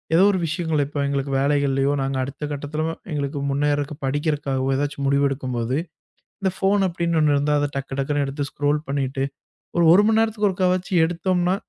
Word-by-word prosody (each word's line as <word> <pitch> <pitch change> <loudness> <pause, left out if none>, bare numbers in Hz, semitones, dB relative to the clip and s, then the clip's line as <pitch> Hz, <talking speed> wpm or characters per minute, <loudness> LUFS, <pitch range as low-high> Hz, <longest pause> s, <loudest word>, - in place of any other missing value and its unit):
ஏதோ 185 - +6
ஒரு 190 - 0
விஷயங்கள் 160 -2 -1
இப்ப 145 +1 -7
எங்களுக்கு 140 0 -2
வேலைகள்லயோ, 140 -1 +2
நாங்க 135 0 -1
அடுத்த 140 +3 -7
கட்டத்துல 145 +2 -3 0.3
எங்களுக்கு 145 -1 -2
முன்னேர்றதுக்கு 145 +1 0
படிக்கறதுக்காகவோ, 140 -2 -1
ஏதாச்சு 145 +1 -2
முடிவு 140 +1 +2
எடுக்கும்போது, 130 -2 -2 0.6
இந்த 190 -1 +1
ஃபோன் 195 0 +2
அப்டின்னு 170 -2 0
ஒண்ணு 150 -1 +3
இருந்தா 145 +1 +1
அத 145 - +1
டக்கு 135 0 -4
டக்குன்னு 145 +1 0
எடுத்து 140 +1 -3
ஸ்க்ரோல் 145 +1 0
பண்ணிட்டு, 135 -1 -1 0.5
ஒரு 170 - +4
1 190 - +7
மணி 220 0 +3
நேரத்துக்கு 220 -2 +1
ஒருக்காவச்சும் 185 -1 +1
எடுத்தோம்னா, 175 +2 0
145 Hz, 165 wpm, -23 LUFS, 140-170 Hz, 0.6 s, 1